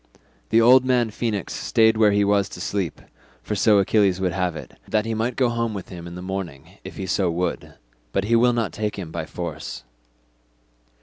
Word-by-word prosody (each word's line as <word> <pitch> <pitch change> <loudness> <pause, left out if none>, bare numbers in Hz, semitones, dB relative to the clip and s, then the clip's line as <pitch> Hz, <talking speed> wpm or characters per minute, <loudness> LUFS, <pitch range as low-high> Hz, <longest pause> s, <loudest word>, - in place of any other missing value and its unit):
The 115 - +4
old 125 +3 +7
man 125 -3 +1
Phoenix 105 -3 -3
stayed 110 -1 +3
where 110 -1 +4
he 100 0 +3
was 100 -1 +2
to - - -9
sleep, 95 -5 -3 0.4
for - - -3
so 105 +1 +4
Achilles 100 -1 +3
would 95 -1 0
have 90 -2 -1
it, - - -9
that 110 0 0
he 115 - -2
might 115 +2 -1
go 130 - +2
home 115 -2 -2
with 95 - -7
him 85 -2 -8
in 85 - -9
the 90 - -7
morning 95 -7 -6
if - - -9
he 95 - -4
so 95 0 +1
would; 85 +1 -3 0.4
but 100 - 0
he 115 +3 +2
will 120 +1 +5
not 115 -3 -1
take 105 -1 -3
him 90 -5 -6
by - - -5
force." - - -6
105 Hz, 205 wpm, -23 LUFS, 95-115 Hz, 0.4 s, old